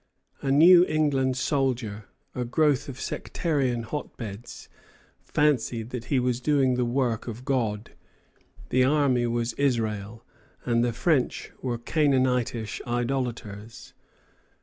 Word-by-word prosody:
The 135 - -1
New 170 +5 +8
England 140 -4 +1
soldier, 125 -7 -1 0.3
a 125 - -2
growth 145 +2 +1
of 135 -1 -8
sectarian 135 -8 -1
hotbeds, 115 -4 -7 0.6
fancied 125 -6 0
that 120 -2 -5
he 135 -1 +1
was 125 0 -1
doing 135 -2 +2
the 125 0 0
work 120 -2 -1
of 120 +2 -7
God. 115 -6 -1 0.8
The 130 0 +3
army 130 -3 +2
was 120 0 -1
Israel, 110 -5 -1 0.4
and 120 -1 +2
the 120 - +1
French 130 +3 0
were 125 -2 -2
Canaanitish 125 -5 0
idolaters. 120 -3 -4
125 Hz, 115 wpm, -26 LUFS, 115-140 Hz, 0.8 s, New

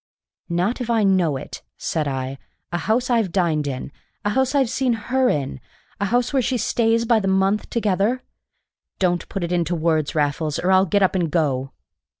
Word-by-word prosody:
"Not 180 +9 0
if 240 - -4
I 225 -2 +3
know 180 -7 +2
it!" - - -8 0.2
said 155 -2 -2
I. 135 0 -3 0.3
"A 175 - -1
house 245 +7 0
I've 225 -6 +2
dined 165 -5 +1
in 135 0 -4 0.3
a 205 - +2
house 265 +4 +1
I've 270 -3 +3
seen 255 +1 0
her 255 +4 +1
in 135 - -2 0.4
a 200 - 0
house 245 +5 +1
where 270 - +3
she 250 +1 0
stays 230 0 +1
by 230 -1 +4
the 195 - -2
month 190 +2 +1
together! 220 +3 0 0.7
Don't 175 -2 0
put 195 - -3
it 170 - -3
into 175 -1 0
words, 160 -2 0
Raffles, 150 0 0
or 185 - +1
I'll 190 +1 +5
get 200 +3 +2
up 190 - +3
and 175 -4 0
go." 135 -5 0
190 Hz, 190 wpm, -22 LUFS, 160-230 Hz, 0.7 s, I'll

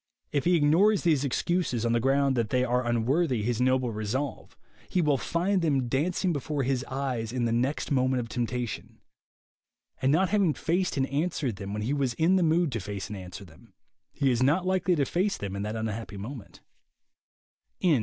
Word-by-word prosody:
If 140 - 0
he 175 +1 +4
ignores 175 +7 +4
these 155 -5 +3
excuses, 140 -3 0
on 115 - +1
the 120 - +3
ground 135 +2 +2
that 115 -3 0
they 125 +1 +2
are 125 0 +1
unworthy 120 +2 +1
his 120 +1 -1
noble 130 -1 +2
resolve, 110 +6 -4 0.3
he 185 - 0
will 150 -4 +3
find 180 +3 0
them 140 -6 +1
dancing 170 +7 0
before 145 0 -2
his 130 0 0
eyes 130 -5 -3
in 125 -1 -1
the 115 - 0
next 125 +7 -1
moment 130 -1 +2
of 120 - -4
temptation; 120 -1 -4 1.0
and 130 - +3
not 180 +4 +3
having 195 -7 +2
faced 180 -1 -1
and 135 - +2
answered 140 - -2
them 100 0 -6
when 105 +1 -3
he 125 +6 -1
was 135 -4 0
in 170 +4 +3
the 190 - +3
mood 165 -1 +2
to 115 - -2
face 100 -2 -5
and 105 - -5
answer 90 +1 -9
them, 80 -7 -19 0.4
he 135 -2 +1
is 120 0 0
not 155 +8 +3
likely 185 -1 +2
to 145 -3 +1
face 190 +8 0
them 100 -1 -5
in 100 - -3
that 105 +2 -3
unhappy 110 -1 -4
moment. 105 -3 -9
130 Hz, 195 wpm, -27 LUFS, 115-160 Hz, 1.0 s, he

